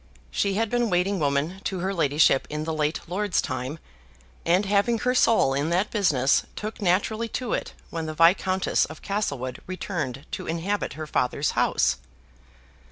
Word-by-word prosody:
She 195 Hz, -, 0 dB
had 225 Hz, 0 st, 0 dB
been 240 Hz, -1 st, +1 dB
waiting 185 Hz, +2 st, +1 dB
woman 150 Hz, +6 st, 0 dB
to 190 Hz, -, -1 dB
her 190 Hz, +2 st, -1 dB
ladyship 150 Hz, -4 st, +3 dB
in 150 Hz, +1 st, -3 dB
the 160 Hz, 0 st, -2 dB
late 155 Hz, 0 st, -1 dB
lord's 195 Hz, +2 st, 0 dB
time, 130 Hz, +2 st, -3 dB, 0.7 s
and, 180 Hz, +4 st, +3 dB
having 205 Hz, +4 st, +2 dB
her 250 Hz, +3 st, +1 dB
soul 225 Hz, -, +4 dB
in 140 Hz, +3 st, 0 dB
that 185 Hz, +4 st, +1 dB
business, 140 Hz, -, +3 dB
took 215 Hz, +1 st, -6 dB
naturally 205 Hz, +5 st, +1 dB
to 245 Hz, +1 st, -3 dB
it -, -, -3 dB, 0.2 s
when 165 Hz, -1 st, -3 dB
the 155 Hz, -, -5 dB
Viscountess 185 Hz, +3 st, +3 dB
of 160 Hz, -, -11 dB
Castlewood 140 Hz, -, -2 dB
returned 155 Hz, -7 st, -4 dB
to -, -, -5 dB
inhabit 170 Hz, +5 st, -2 dB
her 155 Hz, 0 st, -6 dB
father's 140 Hz, 0 st, 0 dB
house. -, -, +2 dB
175 Hz, 165 wpm, -25 LUFS, 150-205 Hz, 0.7 s, soul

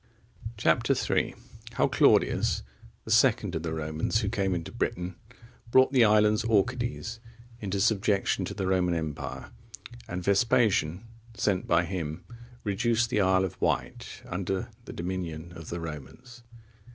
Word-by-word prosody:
Chap. -, -, +2 dB
III. -, -, +1 dB, 0.4 s
How -, -, +2 dB
Claudius, -, -, +3 dB, 0.4 s
the 110 Hz, -, -5 dB
second 115 Hz, -4 st, +3 dB
of 80 Hz, -, -2 dB
the 80 Hz, 0 st, -3 dB
Romans 80 Hz, +6 st, -1 dB
who 100 Hz, -, -1 dB
came 100 Hz, -4 st, 0 dB
into 85 Hz, -1 st, -5 dB
Britain, 90 Hz, 0 st, -3 dB, 0.5 s
brought 130 Hz, +2 st, +5 dB
the 125 Hz, -3 st, +6 dB
islands 105 Hz, 0 st, +4 dB
Orcades 115 Hz, +1 st, 0 dB, 0.4 s
into 100 Hz, -2 st, -3 dB
subjection 100 Hz, -1 st, +1 dB
to -, -, -6 dB
the 95 Hz, -, -2 dB
Roman 90 Hz, -2 st, +1 dB
empire; 70 Hz, -4 st, -5 dB, 0.6 s
and 90 Hz, 0 st, -4 dB
Vespasian, 100 Hz, -3 st, +2 dB, 0.3 s
sent 105 Hz, -6 st, 0 dB
by 85 Hz, 0 st, +3 dB
him, 85 Hz, -3 st, -4 dB, 0.4 s
reduced 115 Hz, +3 st, +1 dB
the 105 Hz, -, +2 dB
Isle 95 Hz, 0 st, +3 dB
of 95 Hz, -, -8 dB
Wight -, -, -2 dB
under 95 Hz, +1 st, -3 dB, 0.2 s
the -, -, -8 dB
dominion 85 Hz, -2 st, -5 dB
of 80 Hz, -1 st, -9 dB
the 85 Hz, -, -4 dB
Romans. 85 Hz, -, -9 dB
95 Hz, 140 wpm, -28 LUFS, 85-110 Hz, 0.6 s, the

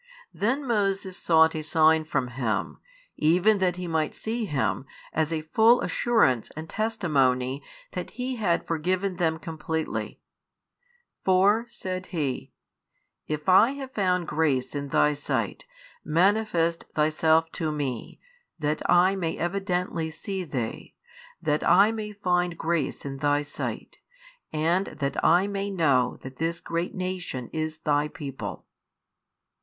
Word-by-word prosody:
Then 260 Hz, +7 st, 0 dB
Moses 195 Hz, -4 st, 0 dB
sought 160 Hz, -2 st, +4 dB
a 155 Hz, -, -3 dB
sign 155 Hz, +1 st, +3 dB
from 135 Hz, -5 st, -1 dB
Him, 115 Hz, -5 st, -2 dB, 0.4 s
even 180 Hz, +7 st, +4 dB
that 180 Hz, -2 st, +1 dB
he 180 Hz, 0 st, -5 dB
might 160 Hz, -2 st, -1 dB
see 225 Hz, +1 st, -2 dB
Him, 140 Hz, -4 st, -1 dB, 0.3 s
as 160 Hz, 0 st, 0 dB
a 160 Hz, -1 st, -2 dB
full 225 Hz, +9 st, +5 dB
assurance 130 Hz, -, +2 dB
and 160 Hz, +1 st, -6 dB
testimony 140 Hz, -, 0 dB, 0.3 s
that -, -, -5 dB
He 255 Hz, 0 st, -2 dB
had 180 Hz, -6 st, +1 dB
forgiven 180 Hz, +3 st, -1 dB
them 160 Hz, -2 st, +1 dB
completely: 160 Hz, -1 st, -4 dB, 1.0 s
For, 200 Hz, +5 st, +4 dB
said 185 Hz, -3 st, -5 dB
he, 145 Hz, -7 st, -3 dB, 0.8 s
if 150 Hz, -1 st, -4 dB
I 215 Hz, +8 st, +6 dB
have 270 Hz, -2 st, -7 dB
found 180 Hz, -6 st, 0 dB
grace 145 Hz, -5 st, 0 dB
in 140 Hz, -1 st, -3 dB
Thy 150 Hz, +2 st, +3 dB
sight, 145 Hz, -, -3 dB, 0.4 s
manifest 170 Hz, 0 st, +2 dB
Thyself 160 Hz, +1 st, +3 dB
to 160 Hz, -3 st, -2 dB
me; 135 Hz, -6 st, -4 dB, 0.4 s
that 150 Hz, -1 st, -1 dB
I 180 Hz, +2 st, +5 dB
may 170 Hz, -4 st, -2 dB
evidently 180 Hz, -2 st, -1 dB
see 190 Hz, +4 st, -4 dB
Thee, 130 Hz, -9 st, -5 dB, 0.5 s
that 150 Hz, -1 st, +1 dB
I 200 Hz, +4 st, +6 dB
may 215 Hz, -2 st, -4 dB
find 180 Hz, -4 st, 0 dB
grace 165 Hz, -4 st, -1 dB
in 135 Hz, -1 st, -4 dB
Thy 145 Hz, +1 st, +1 dB
sight, 145 Hz, -, -5 dB, 0.5 s
and 170 Hz, +5 st, +1 dB
that 140 Hz, -2 st, -3 dB
I 175 Hz, +4 st, +5 dB
may 200 Hz, 0 st, -2 dB
know 140 Hz, -10 st, +2 dB
that 130 Hz, -1 st, -9 dB
this 165 Hz, +1 st, -1 dB
great 170 Hz, +1 st, -3 dB
nation 185 Hz, -9 st, -4 dB
is 155 Hz, 0 st, -2 dB
Thy 150 Hz, -1 st, +1 dB
people. 135 Hz, -, -7 dB
165 Hz, 135 wpm, -26 LUFS, 150-190 Hz, 1.0 s, I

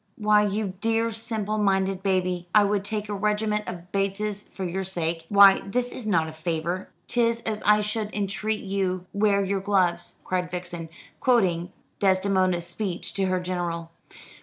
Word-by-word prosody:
"Why, 210 Hz, -1 st, +4 dB
you 200 Hz, -1 st, -2 dB
dear 225 Hz, 0 st, +1 dB
simple 220 Hz, -1 st, -2 dB
minded 195 Hz, -2 st, +1 dB
baby, 185 Hz, -2 st, 0 dB
I 210 Hz, -, +8 dB
would 200 Hz, -1 st, +1 dB
take 210 Hz, 0 st, -3 dB
a 205 Hz, -, -3 dB
regiment 210 Hz, +1 st, 0 dB
of 180 Hz, 0 st, -7 dB
Bateses 200 Hz, +1 st, -1 dB
for 195 Hz, -, -8 dB
your 185 Hz, +2 st, -2 dB
sake. 165 Hz, -3 st, -2 dB
Why 200 Hz, -1 st, +8 dB
this 245 Hz, +5 st, -1 dB
is 235 Hz, -, -6 dB
not 165 Hz, -6 st, +2 dB
a -, -, -6 dB
favour 165 Hz, +3 st, -3 dB
" -, -, -42 dB
"''Tis 235 Hz, -1 st, +1 dB
as 215 Hz, -2 st, -3 dB
I 210 Hz, 0 st, +5 dB
should 210 Hz, 0 st, -2 dB
entreat 210 Hz, +2 st, -2 dB
you 190 Hz, -2 st, -1 dB
wear 200 Hz, -1 st, +2 dB
your 195 Hz, 0 st, 0 dB
gloves,'" 190 Hz, -3 st, +1 dB
cried 180 Hz, -1 st, -1 dB
Vixen, 175 Hz, -2 st, -5 dB, 0.3 s
quoting 180 Hz, -9 st, +2 dB, 0.3 s
Desdemona's 185 Hz, -2 st, +2 dB
speech 175 Hz, +1 st, -3 dB
to 195 Hz, -, 0 dB
her 185 Hz, 0 st, +1 dB
general. 175 Hz, -2 st, -3 dB
195 Hz, 165 wpm, -25 LUFS, 180-210 Hz, 0.3 s, I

